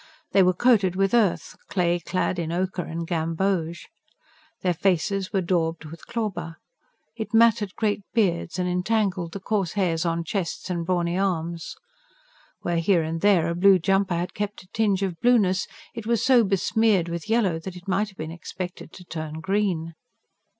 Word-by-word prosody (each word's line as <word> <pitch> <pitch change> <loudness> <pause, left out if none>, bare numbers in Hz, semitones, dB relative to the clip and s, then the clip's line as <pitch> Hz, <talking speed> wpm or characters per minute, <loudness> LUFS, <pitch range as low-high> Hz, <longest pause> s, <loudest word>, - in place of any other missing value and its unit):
They 195 - +5
were 185 -1 +4
coated 200 -5 +3
with 195 +2 +1
earth, 220 -7 +2
clay 175 -2 +1
clad 180 +1 -1
in 165 -1 -2
ochre 185 +1 -1
and 165 0 -5
gamboge. 165 +1 -1 0.8
Their 180 -1 +2
faces 185 +2 0
were 195 - +1
daubed 170 -2 -1
with 160 +2 -11
clauber; 185 -8 -3 0.6
it 225 0 -4
matted 225 -4 +4
great 210 -2 0
beards, 180 -6 0
and 180 -1 0
entangled 180 -2 0
the 200 - -5
coarse 195 -3 -1
hairs 175 -5 0
on 170 -1 -1
chests 185 +1 -3
and 170 -2 -2
brawny 175 0 0
arms. 170 -4 -2 0.9
Where, 170 -1 0
here 170 0 +3
and 165 +1 -3
there, 195 -5 +4
a 170 - 0
blue 190 +2 +6
jumper 195 +1 +1
had 175 +1 -3
kept 205 -1 -4
a - - -22
tinge 205 -3 +1
of 180 -4 -3
blueness, 210 -7 +3 0.3
it 230 -3 -7
was 235 -2 +1
so 255 -3 +6
besmeared 200 -1 +2
with 170 +3 -5
yellow 205 -8 +2
that 185 +2 -7
it 180 +2 -12
might 200 +3 +1
have 190 - -19
been 155 +1 -5
expected 175 0 -7
to 180 - -11
turn 155 -3 -5
green. 170 -1 -1
185 Hz, 170 wpm, -25 LUFS, 170-200 Hz, 0.9 s, blue